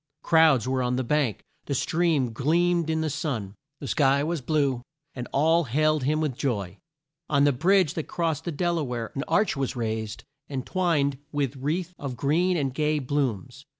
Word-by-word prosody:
Crowds 160 -8 +4
were 130 0 0
on 125 0 0
the 130 - 0
bank, 135 -3 0 0.2
the 140 - -1
stream 155 -5 +1
gleamed 170 +5 +1
in 160 0 0
the 160 - 0
sun, 135 - -3 0.3
the 140 - -6
sky 140 0 +3
was 165 -1 -2
blue, 140 -3 0 0.3
and 125 -2 -6
all 160 +4 +3
hailed 155 +4 +2
him 155 +2 +1
with 155 -4 0
joy. 105 -9 -3 0.5
On 140 -1 +3
the 145 - +5
bridge 175 +4 +3
that 160 - -4
crossed 160 -3 -2
the 170 - -2
Del 170 +2 0
a - - -1
ware 120 -4 -4
an 135 - -3
arch 210 -4 +2
was 135 -2 -2
raised 110 -2 -3 0.2
and 135 -3 -4
twined 150 -7 +1
with 140 -2 -1
wreaths 160 +7 -2
of 135 -4 -5
green 170 +8 +2
and 135 -4 -1
gay 150 +2 +1
blooms. 130 -2 -2
145 Hz, 185 wpm, -26 LUFS, 130-160 Hz, 0.5 s, the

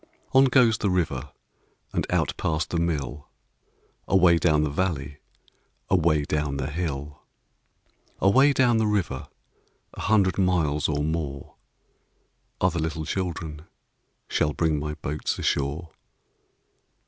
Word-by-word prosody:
On 135 +1 +7
goes 125 -4 +4
the 100 - +1
river 80 -7 -1 0.6
And - - -1
out - - +1
past 80 -1 -2
the 85 - 0
mill, 75 -4 -3 0.8
Away 90 -3 +5
down 75 -3 +3
the 75 - -1
valley, 75 -4 -2 0.7
Away 80 -5 +3
down 75 -1 -1
the 70 +1 -3
hill. 75 -3 -4 1.0
Away 130 +9 +5
down 125 -4 +3
the 110 -1 +2
river, 95 -11 -1 0.7
A - - -8
hundred 100 -3 +2
miles 80 -6 +1
or 75 -1 0
more, 75 -3 -3 1.1
Other 90 -2 +1
little 80 0 -3
children 80 -3 -4 0.6
Shall 75 - 0
bring 80 -2 +1
my 75 +1 -4
boats 75 0 -3
ashore. 75 +4 -1
80 Hz, 120 wpm, -25 LUFS, 75-95 Hz, 1.1 s, On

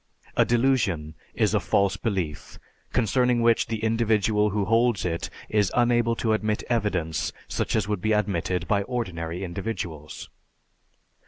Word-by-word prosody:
A - - +4
delusion 115 - +1 0.2
is - - +2
a - - +3
false 100 -1 +1
belief, 90 -9 -3 0.3
concerning 125 0 +2
which 115 -1 +3
the 110 -1 -4
individual 110 -2 +2
who 105 0 -1
holds 115 -1 +2
it 85 -1 -2 0.2
is 105 -3 +1
unable 120 -1 +3
to 110 -1 0
admit 110 0 -1
evidence 100 -9 0 0.2
such - - -2
as - - +1
would 105 -3 -2
be 110 - 0
admitted 90 -4 0
by 100 -1 +2
ordinary 90 -7 -4
individuals. 85 -5 -5
105 Hz, 140 wpm, -25 LUFS, 90-115 Hz, 0.3 s, A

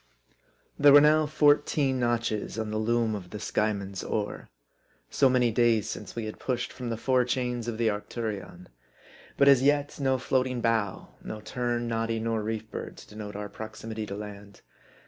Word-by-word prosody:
THERE 145 -1 +7
were 145 - +11
now 155 +1 +4
fourteen 145 -2 +3
notches 115 -3 -1
on 110 -1 -3
the 110 - -1
loom 115 0 +1
of 95 -4 -6
the 105 - -6
Skyeman's 100 -2 -2
oar: 105 -1 -3 0.6
So 135 - +4
many 125 -2 +3
days 115 -2 +3
since 105 - -7
we 115 -2 -3
had 110 - -7
pushed 125 -2 -2
from 125 -2 -5
the 115 - -2
fore 125 +2 +2
chains 125 -1 -2
of 115 -2 -3
the 115 -1 +2
Arcturion. 105 -3 -5 0.7
But 140 - +5
as 135 -3 +7
yet, 145 +1 +1
no 135 -1 +2
floating 130 -1 0
bough, 115 -4 0
no 110 - -6
tern, 120 +2 -2
noddy, 115 0 -1
nor 115 0 -1
reef 110 0 -4
bird, - - -6
to - - -13
denote 105 -1 -8
our 105 0 -4
proximity 110 +1 -7
to 100 - -5
land. 100 -1 -9
115 Hz, 175 wpm, -28 LUFS, 105-125 Hz, 0.7 s, were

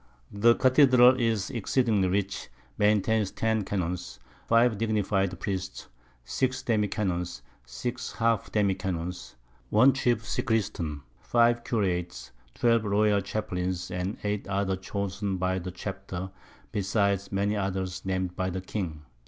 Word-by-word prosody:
The 115 +3 +4
Cathedral 130 -1 +6
is 115 -2 0
exceeding 115 -2 +1
rich, 100 -3 -2 0.3
maintains 105 0 +2
10 110 -1 0
Canons, 90 -7 -3 0.3
5 115 0 +4
dignify'd 100 -4 0
Priests, 95 -2 -4 0.4
6 130 - -1
Demi 110 -3 +1
Canons, 90 - -2 0.2
6 120 - -4
half 115 -2 0
Demi 100 -3 +2
Canons, 90 -5 -5 0.3
1 130 +6 +6
Chief 120 -3 +1
Sacristain, 95 - -1 0.2
4 120 0 +4
Curates, 90 - -2 0.2
12 115 -2 +3
Royal 105 0 +2
Chaplains, 90 -3 -3
and 90 +5 -3
8 105 -1 -2
others 100 -1 -1
chosen 100 0 -3
by 95 +1 0
the 90 +1 -6
Chapter, 95 0 -6 0.4
besides 100 -1 0
many 100 +2 0
others 95 -2 -2
nam'd 95 -1 -2
by 95 0 -1
the 95 +1 -4
King. 90 -6 -5
100 Hz, 125 wpm, -28 LUFS, 95-110 Hz, 0.4 s, Cathedral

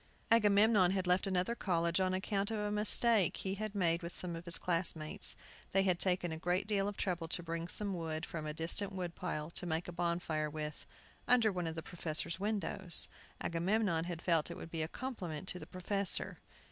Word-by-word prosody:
Agamemnon 210 -3 +5
had 190 0 0
left 180 +2 +2
another 185 +3 +1
college 170 -5 0
on 185 0 +2
account 195 +1 -1
of 225 - -2
a 210 0 -1
mistake 210 -2 +4
he 190 - -3
had 215 +1 -4
made 170 -3 +2
with 170 0 -7
some 175 -2 -3
of 165 +1 -8
his 170 -1 -1
classmates. 170 +1 +1 0.4
They 195 0 +4
had 180 -2 +2
taken 180 -2 0
a 160 - -5
great 180 +3 0
deal 200 -2 +1
of 205 - -4
trouble 175 -3 -1
to 175 +1 0
bring 165 0 -3
some 200 +3 -3
wood 160 -3 -3
from 155 -2 -5
a - - -2
distant 180 +5 0
wood 180 -3 -4
pile 150 0 -4
to 180 - -2
make 160 +1 -1
a - - -5
bonfire 170 -3 -1
with, 150 0 -6 0.4
under 235 -3 +5
one 180 -3 -2
of 160 - -4
the 160 - -5
professors' 170 0 -2
windows. 195 -3 +1 0.3
Agamemnon 170 0 +1
had 170 -1 -5
felt 165 -4 +2
it - - -6
would 165 - -9
be 165 - -2
a 155 - -1
compliment 190 - -5
to 180 - -4
the - - -9
professor. 195 +1 +1
180 Hz, 205 wpm, -35 LUFS, 165-200 Hz, 0.4 s, Agamemnon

